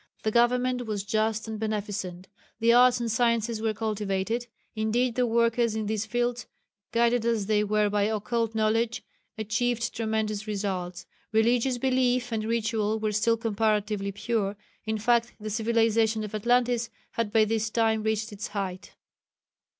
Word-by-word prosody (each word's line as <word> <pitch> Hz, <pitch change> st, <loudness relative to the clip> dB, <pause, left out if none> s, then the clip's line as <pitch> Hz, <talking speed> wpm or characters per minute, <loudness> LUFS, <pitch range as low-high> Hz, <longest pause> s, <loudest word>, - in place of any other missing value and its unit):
The 215 Hz, -, +1 dB
government 245 Hz, +1 st, +2 dB
was 205 Hz, -2 st, -2 dB
just 220 Hz, +1 st, 0 dB
and 220 Hz, -1 st, -5 dB
beneficent; 205 Hz, -4 st, -4 dB, 0.3 s
the 230 Hz, 0 st, +4 dB
arts 245 Hz, 0 st, +6 dB
and 235 Hz, -1 st, -1 dB
sciences 230 Hz, -1 st, +1 dB
were 220 Hz, -1 st, 0 dB
cultivated 215 Hz, +1 st, -2 dB, 0.3 s
indeed 230 Hz, +3 st, +1 dB
the 250 Hz, +1 st, +1 dB
workers 230 Hz, 0 st, +2 dB
in 220 Hz, -1 st, -2 dB
these 215 Hz, +1 st, -2 dB
fields, 240 Hz, +1 st, -1 dB, 0.4 s
guided 235 Hz, 0 st, +2 dB
as 230 Hz, -3 st, 0 dB
they 210 Hz, 0 st, +2 dB
were 210 Hz, 0 st, +2 dB
by 205 Hz, 0 st, +1 dB
occult 225 Hz, +1 st, -1 dB
knowledge, 225 Hz, +1 st, +1 dB, 0.3 s
achieved 230 Hz, +2 st, -1 dB
tremendous 220 Hz, -2 st, -2 dB
results; 185 Hz, -3 st, -3 dB, 0.3 s
religious 235 Hz, +3 st, +2 dB
belief 250 Hz, -1 st, +1 dB
and 220 Hz, -1 st, -1 dB
ritual 220 Hz, -1 st, 0 dB
was 215 Hz, -1 st, 0 dB
still 230 Hz, +2 st, +2 dB
comparatively 210 Hz, -2 st, 0 dB
pure 205 Hz, 0 st, -1 dB, 0.3 s
in 220 Hz, 0 st, -1 dB
fact 235 Hz, +2 st, +2 dB
the 215 Hz, 0 st, -5 dB
civilization 225 Hz, 0 st, +2 dB
of 210 Hz, -, -7 dB
Atlantis 240 Hz, +2 st, +1 dB, 0.2 s
had 230 Hz, -3 st, -2 dB
by 220 Hz, -1 st, +4 dB
this 220 Hz, 0 st, -1 dB
time 220 Hz, -1 st, +1 dB
reached 220 Hz, +1 st, -1 dB
its 205 Hz, +1 st, -5 dB
height. 195 Hz, -2 st, -5 dB
220 Hz, 150 wpm, -27 LUFS, 210-235 Hz, 0.4 s, arts